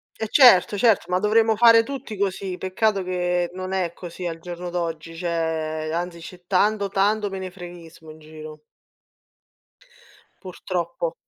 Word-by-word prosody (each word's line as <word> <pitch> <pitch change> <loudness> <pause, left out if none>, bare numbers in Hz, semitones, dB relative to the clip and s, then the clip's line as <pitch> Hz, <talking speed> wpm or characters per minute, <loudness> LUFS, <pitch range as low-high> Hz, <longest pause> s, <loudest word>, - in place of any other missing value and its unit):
E 220 - -4
certo, 210 -7 +6
certo, 225 0 +3
ma 180 - +2
dovremmo 220 +2 +3
fare 230 0 +7
tutti 260 -2 -7
così. 190 -2 -2
Peccato 195 +2 0
che 180 -1 -1
non 185 0 -5
è 180 -3 -1
così 175 0 -7
al 165 -1 -5
giorno 175 +1 -7
d'oggi, 165 -2 -4
cioè, 160 -2 -2
anzi 170 +1 -4
c'è 175 +1 -12
tanto, 200 +2 +1
tanto 205 +2 +1
menefreghismo 175 -4 -9
in 155 - -15
giro. 155 0 -11 1.8
Purtroppo. 175 -3 -4
180 Hz, 135 wpm, -23 LUFS, 170-200 Hz, 1.8 s, fare